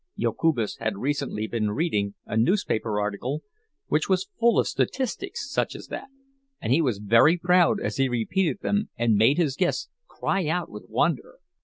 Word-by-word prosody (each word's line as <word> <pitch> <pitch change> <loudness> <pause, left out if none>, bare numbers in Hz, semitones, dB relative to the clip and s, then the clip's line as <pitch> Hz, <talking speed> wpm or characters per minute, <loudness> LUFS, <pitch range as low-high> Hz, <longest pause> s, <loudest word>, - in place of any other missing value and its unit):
Jokubas 140 -10 0
had 110 -3 -2
recently 135 -3 -2
been 110 0 -1
reading 105 -6 -1
a - - -4
newspaper 110 - +1
article 110 +9 -3 0.4
which 150 +4 0
was 190 - +1
full 235 0 +4
of - - +3
statistics 280 - -2
such 275 - -1
as - - -10
that, - - -6 0.5
and 120 - 0
he 160 - +4
was 125 -9 0
very 115 - +5
proud 180 0 +3
as - - -3
he 135 -1 +2
repeated 165 - 0
them 205 +1 0
and 120 -1 +2
made 115 +8 +4
his 155 -7 +1
guests 180 +2 0 0.2
cry 195 -5 -1
out 175 +3 -1
with 105 - -9
wonder. - - 0
140 Hz, 170 wpm, -25 LUFS, 110-180 Hz, 0.5 s, very